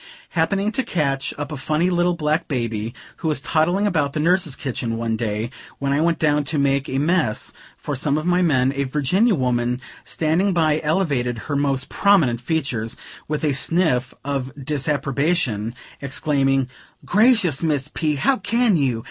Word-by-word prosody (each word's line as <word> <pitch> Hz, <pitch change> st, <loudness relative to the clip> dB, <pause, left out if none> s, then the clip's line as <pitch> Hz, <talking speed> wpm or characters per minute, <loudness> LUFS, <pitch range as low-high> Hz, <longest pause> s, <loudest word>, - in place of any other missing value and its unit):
Happening 195 Hz, +5 st, 0 dB
to 245 Hz, -, 0 dB
catch 140 Hz, -, -1 dB
up 145 Hz, 0 st, -5 dB
a 150 Hz, -, -4 dB
funny 155 Hz, +6 st, 0 dB
little 175 Hz, 0 st, +2 dB
black 155 Hz, +1 st, 0 dB
baby, 115 Hz, -3 st, -3 dB, 0.2 s
who -, -, -4 dB
was 150 Hz, -3 st, +1 dB
toddling 175 Hz, +7 st, +1 dB
about 150 Hz, -8 st, +1 dB
the -, -, -2 dB
nurses' 170 Hz, -2 st, +2 dB
kitchen, 120 Hz, -4 st, -3 dB
one 115 Hz, -1 st, -1 dB
day, 110 Hz, +1 st, -2 dB, 0.3 s
when 140 Hz, 0 st, -1 dB
I 145 Hz, -, +2 dB
went 165 Hz, 0 st, +2 dB
down 150 Hz, -2 st, +2 dB
to 150 Hz, +2 st, -1 dB
make 140 Hz, -1 st, +1 dB
a 130 Hz, -, -1 dB
mess 150 Hz, -6 st, +1 dB, 0.2 s
for 145 Hz, -, -4 dB
some 140 Hz, +2 st, +1 dB
of 155 Hz, -, -3 dB
my 180 Hz, +1 st, +2 dB
men, 135 Hz, -6 st, +2 dB
a 140 Hz, 0 st, 0 dB
Virginia 165 Hz, -, +2 dB
woman 125 Hz, -2 st, 0 dB, 0.2 s
standing 165 Hz, +5 st, 0 dB
by 155 Hz, -3 st, +2 dB
elevated 145 Hz, -7 st, 0 dB
her 145 Hz, +5 st, -4 dB
most 140 Hz, -1 st, 0 dB
prominent 160 Hz, -, +3 dB
features, 125 Hz, -6 st, -2 dB, 0.3 s
with 150 Hz, 0 st, -3 dB
a 150 Hz, -2 st, +2 dB
sniff 140 Hz, -4 st, +1 dB
of 135 Hz, -2 st, -2 dB
disapprobation, 140 Hz, -, 0 dB, 0.3 s
exclaiming: 135 Hz, -1 st, +1 dB, 0.4 s
"Gracious, 210 Hz, -, +3 dB
Miss 150 Hz, -4 st, 0 dB
P.! 155 Hz, -2 st, 0 dB
how 255 Hz, -, +2 dB
can 225 Hz, +1 st, +2 dB
you? 130 Hz, -6 st, +1 dB
145 Hz, 165 wpm, -21 LUFS, 130-170 Hz, 0.4 s, prominent